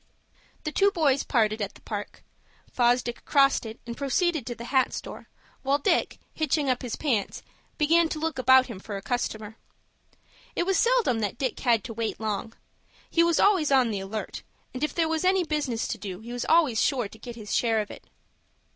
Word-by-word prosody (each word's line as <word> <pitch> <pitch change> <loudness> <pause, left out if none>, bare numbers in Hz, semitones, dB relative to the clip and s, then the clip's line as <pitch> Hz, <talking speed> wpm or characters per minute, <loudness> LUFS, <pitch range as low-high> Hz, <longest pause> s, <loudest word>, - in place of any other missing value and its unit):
The 305 - -2
two 400 +5 +4
boys 300 -8 +2
parted 220 -3 +1
at 200 -1 -3
the - - -16
Park. 205 -2 -6 0.5
Fosdick 240 -1 +1
crossed 275 -4 +3
it, 220 - -9
and 235 0 -6
proceeded 285 +1 0
to 240 - -4
the 235 - -8
hat 260 -1 +3
store, - - -7 0.3
while 275 +1 +2
Dick, 285 - +1 0.2
hitching 300 -3 +1
up 250 - -2
his 245 -3 -4
pants, 240 -10 -1 0.3
began 325 +2 +3
to 315 - -3
look 320 -2 -2
about 260 0 +6
him 230 -7 -8
for 200 +1 -6
a - - -7
customer. 220 -3 -3 1.0
It 345 - 0
was 385 0 +2
seldom 470 - +3
that 210 +2 -2
Dick 260 -1 -2
had 230 -5 +2
to 225 - -6
wait 225 0 -3
long. 220 +1 -3 0.6
He 335 - +4
was 340 -1 +2
always 370 -8 +3
on 255 -4 +4
the 205 - -2
alert, 200 +3 -5 0.3
and 255 +3 -4
if 300 - -1
there 330 -2 +2
was 320 +1 -1
any 370 0 +3
business 295 -8 -2
to 225 - -3
do 190 -2 -6
he 235 +2 -8
was 245 - -3
always 310 -9 +3
sure 250 -6 +1
to 220 - -15
get 240 +2 -8
his 215 -3 -6
share 225 -2 +2
of 210 - -4
it. - - -12
255 Hz, 200 wpm, -26 LUFS, 225-310 Hz, 1.0 s, about